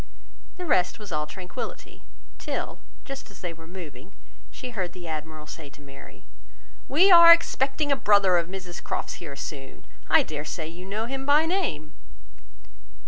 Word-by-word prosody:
The 360 - -5
rest 180 - +2
was 210 -3 -10
all 150 -1 -1
tranquillity; 185 +9 -8 0.4
till, - - -4 0.3
just 275 -4 -8
as 200 - -15
they 175 -2 -4
were 165 0 -14
moving, 170 -2 -10 0.3
she 255 -2 -8
heard 185 -6 -3
the 175 -2 -9
Admiral 155 -1 -6
say 150 -1 -9
to 150 - -18
Mary— 140 -1 -14 0.6
"We 360 +8 +5
are 340 -1 +11
expecting 290 -3 +3
a - - +5
brother 200 -6 +4
of 170 -1 0
Mrs 180 -1 -7
Croft's - - -4
here 145 -5 -7
soon; 135 -1 -8 0.2
I - - +6
dare 150 -2 -5
say 155 +1 -5
you 175 +3 -9
know 210 +3 -3
him 270 +2 -4
by 295 +2 +5
name." 165 - -2
180 Hz, 165 wpm, -26 LUFS, -, 0.6 s, are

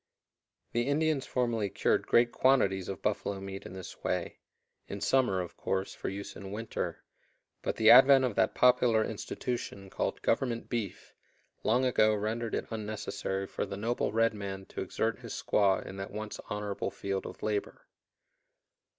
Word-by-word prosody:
The 120 +2 0
Indians 150 -1 +1
formerly 115 -5 0
cured 100 - +1
great 120 0 +4
quantities 95 -9 +2
of 95 -3 -6
buffalo 100 -1 -1
meat 95 0 -7
in - - -10
this 95 -2 -9
way - - -2 0.5
in 100 - -5
summer, 125 -6 +2
of 90 - -7
course, 95 0 -2
for - - -4
use 100 +1 -6
in 95 -1 -8
winter 110 +2 -4 0.6
but - - -2
the 110 0 +6
advent 135 +1 +8
of 125 - -1
that - - +2
popular 125 -3 +4
institution 105 -3 -4
called - - -2
"Government 120 -3 0
beef" 115 -5 -4 0.5
long 125 +4 +2
ago 110 -4 +4
rendered 110 +2 -2
it - - -2
unnecessary 105 -3 -3
for - - -3
the 100 - -5
noble 115 +4 -1
red 115 +1 +3
man 100 -2 -6
to - - -5
exert - - -1
his - - -7
squaw 100 -2 +2
in 95 - -8
that 95 0 -5
once 105 0 -6
honorable 105 -1 -2
field 100 0 -3
of - - -10
labor. 110 - -2
110 Hz, 160 wpm, -30 LUFS, 100-120 Hz, 0.6 s, advent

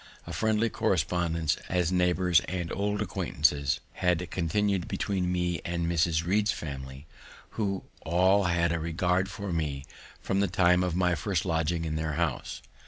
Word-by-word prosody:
A - - -7
friendly 110 +1 +1
correspondence 85 -5 0
as 90 -1 +1
neighbours 90 -1 +3
and 90 0 -3
old 105 +1 0
acquaintances 75 -1 +1
had 90 -1 0
continued 95 +2 0
between 95 -3 -1
me 90 -2 -1
and 85 -1 -2
Mrs. 85 -1 +1
Read's 105 +3 +2
family, 65 -4 -7 0.5
who 100 -4 -2 0.2
all 95 +4 +3
had 85 -1 +2
a 85 - 0
regard 90 +4 0
for 100 -1 -5
me 75 -4 -2 0.3
from 95 - -1
the 100 - +3
time 90 -1 +3
of 90 -2 -1
my 90 -1 +2
first 85 +2 -1
lodging 80 0 0
in 80 -1 -2
their 80 -1 -2
house. - - -2
90 Hz, 155 wpm, -28 LUFS, 80-95 Hz, 0.5 s, neighbours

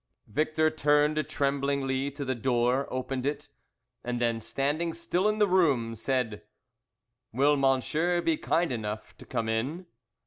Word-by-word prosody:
Victor 155 +6 +1
turned 150 0 +2
tremblingly 140 -1 0
to 140 0 -6
the 130 - 0
door, 125 +2 +1
opened 130 0 -3
it, 145 +1 -3 0.5
and 120 0 -2
then 115 -1 +1
standing 140 +9 -1
still 175 +4 0
in 215 - 0
the 210 -1 +4
room, 145 -12 +2
said 115 -2 -1 0.9
"Will 140 +5 +3
monsieur 145 +6 +1
be 165 -2 +1
kind 165 +1 0
enough 105 -2 -5
to - - -13
come 115 -3 -2
in?" 130 +11 -2
140 Hz, 140 wpm, -28 LUFS, 120-155 Hz, 0.9 s, the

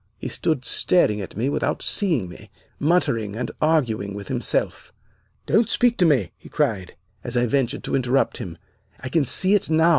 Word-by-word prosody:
"He - - -6
stood 140 -6 -1
staring 105 - +2
at 95 - -9
me 120 +4 0
without 140 - -1
seeing 165 - +1
me, 90 - -13 0.3
muttering, 115 - +1
and 120 +1 -4
arguing 115 -11 0
with 100 -1 -8
himself. - - -2 0.5
"'Don't 225 0 +2
speak 240 -1 +2
to 180 - +5
me,' 120 - +1
he - - -14
cried, 110 -12 -2 0.3
as 120 0 -3
I 120 - +3
ventured 135 +2 -1
to - - -2
interrupt 130 0 +1
him. 85 -3 -7 0.4
'I 130 - -5
can 150 +1 +1
see 185 - +4
it 205 -4 +1
now. 160 +1 +4
130 Hz, 180 wpm, -22 LUFS, 110-160 Hz, 0.5 s, to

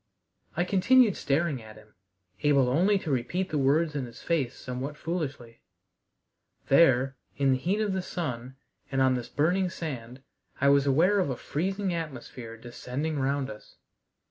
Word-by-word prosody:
I 175 - +3
continued 205 +4 +4
staring 145 -2 0
at 110 -1 -12
him, 110 0 -18 0.5
able 140 -4 +4
only 185 +10 +3
to 160 -5 -4
repeat 155 +9 -1
the 150 - -1
words 150 +3 +2
in 135 -4 -2
his 115 - -12
face 140 -7 -1
somewhat 130 +4 -5
foolishly. 145 -9 -5 1.1
There, 135 -3 +4 0.2
in 140 -1 +3
the 130 - +2
heat 185 +9 0
of 205 -3 0
the 190 - -1
sun, 130 -8 -5 0.4
and 135 - 0
on 130 -1 +4
this 125 -2 -3
burning 180 +5 +1
sand, 130 -7 -6 0.4
I 140 - +4
was 140 0 +4
aware 175 +9 +4
of 180 - +1
a 130 - -2
freezing 190 +4 -2
atmosphere 135 -8 -6
descending 125 +6 -4
round 135 -1 0
us. 105 - -13
140 Hz, 160 wpm, -28 LUFS, 130-170 Hz, 1.1 s, continued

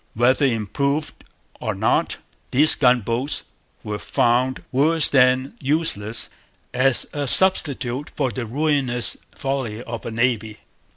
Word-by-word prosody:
Whether 130 +4 +2
'improved' 140 +6 -3 0.4
or - - -4
not, - - -1 0.3
these 150 +5 +7
gunboats 125 +1 -1 0.4
were 105 0 -6
found 125 +5 -1
worse 150 +4 +2
than 130 0 +1
useless 130 -7 0 0.5
as 130 0 +1
a 145 -1 -4
substitute 140 -6 +5
for 130 - -2
'the 120 -2 -6
ruinous 135 -2 -1 0.2
folly 130 -5 -5
of 115 -2 -8
a - - -4
navy.' 110 -2 -2
130 Hz, 115 wpm, -20 LUFS, 120-140 Hz, 0.5 s, these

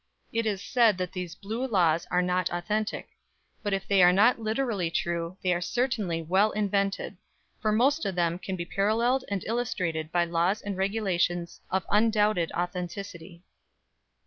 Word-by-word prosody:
It 230 -1 0
is 200 -2 -2
said 230 -6 +3
that 180 -1 -3
these 180 -3 -5
"Blue 225 +6 -4
Laws" 170 -7 +2
are 180 0 +2
not 180 0 0
authentic; 210 +5 -2 0.5
but 205 - -2
if 195 0 -2
they 200 -2 +4
are 180 0 +8
not 220 +7 +4
literally 220 -5 -1
true, 170 +1 -2
they 180 -1 +3
are 175 - -2
certainly 210 -7 -1
well 190 +6 +3
invented, 200 -1 -1 0.4
for 215 -3 +1
most 275 +8 +2
of 190 - -3
them 170 0 0
can 190 0 -4
be 170 -1 -4
paralleled 230 +8 +1
and 200 -2 -2
illustrated 180 -9 -2
by 175 0 +2
laws 170 +4 0
and 205 -1 -3
regulations 185 -3 -1
of 190 -2 -1
undoubted 210 -4 +2
authenticity. 175 0 -5
195 Hz, 160 wpm, -27 LUFS, 175-215 Hz, 0.5 s, are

